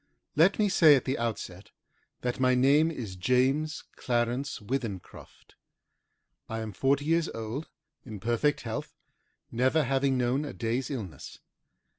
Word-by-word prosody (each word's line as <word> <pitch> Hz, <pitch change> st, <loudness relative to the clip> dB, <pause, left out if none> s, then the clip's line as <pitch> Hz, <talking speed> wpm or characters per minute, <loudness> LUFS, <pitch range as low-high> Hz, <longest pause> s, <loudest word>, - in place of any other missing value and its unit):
Let 170 Hz, +6 st, +4 dB
me 210 Hz, -, +3 dB
say 165 Hz, -6 st, +6 dB
at 130 Hz, -, -1 dB
the 130 Hz, 0 st, -1 dB
outset 105 Hz, -5 st, -4 dB, 0.5 s
that 125 Hz, 0 st, -2 dB
my 130 Hz, -1 st, +3 dB
name 140 Hz, +5 st, +4 dB
is 115 Hz, -12 st, -6 dB
James 130 Hz, +9 st, +1 dB
Clarence 120 Hz, +3 st, -1 dB
Withencroft. 110 Hz, -4 st, -6 dB, 1.0 s
I 110 Hz, -, -3 dB
am 110 Hz, -1 st, -5 dB
forty 140 Hz, +4 st, +1 dB
years 165 Hz, +1 st, +2 dB
old, 115 Hz, +7 st, -5 dB, 0.3 s
in 110 Hz, -5 st, -8 dB
perfect 120 Hz, +8 st, +1 dB
health, -, -, -5 dB, 0.6 s
never 130 Hz, +6 st, +2 dB
having 135 Hz, 0 st, +1 dB
known 125 Hz, +3 st, +1 dB
a 145 Hz, -, -6 dB
day's 120 Hz, +3 st, -2 dB
illness. 100 Hz, -, -7 dB
130 Hz, 135 wpm, -28 LUFS, 115-145 Hz, 1.0 s, say